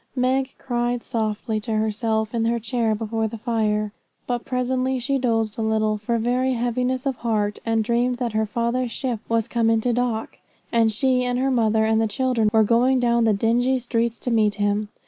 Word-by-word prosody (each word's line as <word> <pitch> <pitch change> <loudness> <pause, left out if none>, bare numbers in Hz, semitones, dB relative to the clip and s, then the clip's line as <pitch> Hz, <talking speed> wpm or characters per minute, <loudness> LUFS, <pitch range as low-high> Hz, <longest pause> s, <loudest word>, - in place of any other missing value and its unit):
Meg 260 +1 0
cried 240 -1 -2
softly 220 -1 -2
to 220 +1 -4
herself 220 +1 -1
in 230 -1 0
her 235 +1 +1
chair 225 0 0
before 225 +1 -2
the 230 +1 -7
fire, 215 -2 0 0.3
but 245 -1 -2
presently 255 +1 -1
she 270 +2 -1
dozed 225 -3 0
a - - 0
little 220 -1 +1
for 215 +3 -1
very 250 +3 +1
heaviness 250 +2 -1
of 270 -3 -1
heart, 210 -3 -1
and 225 -1 +2
dreamed 240 +2 +1
that 240 -3 -2
her 220 0 0
father's 235 +3 -1
ship 245 -3 -3
was 230 0 +1
come 230 -1 +1
into 225 +2 +2
dock, 235 -2 -2 0.3
and 225 -1 +3
she, 255 +3 +1
and 245 0 -1
her 265 +1 +1
mother, 220 -3 +2
and 220 0 +2
the 225 - +2
children 235 -1 +1
were 220 0 +4
going 245 +4 +3
down 235 -1 +2
the 220 - +4
dingy 240 +5 +2
streets 235 -2 -1
to 245 - -4
meet 215 -3 +2
him. 205 +1 0
230 Hz, 195 wpm, -23 LUFS, 220-250 Hz, 0.3 s, were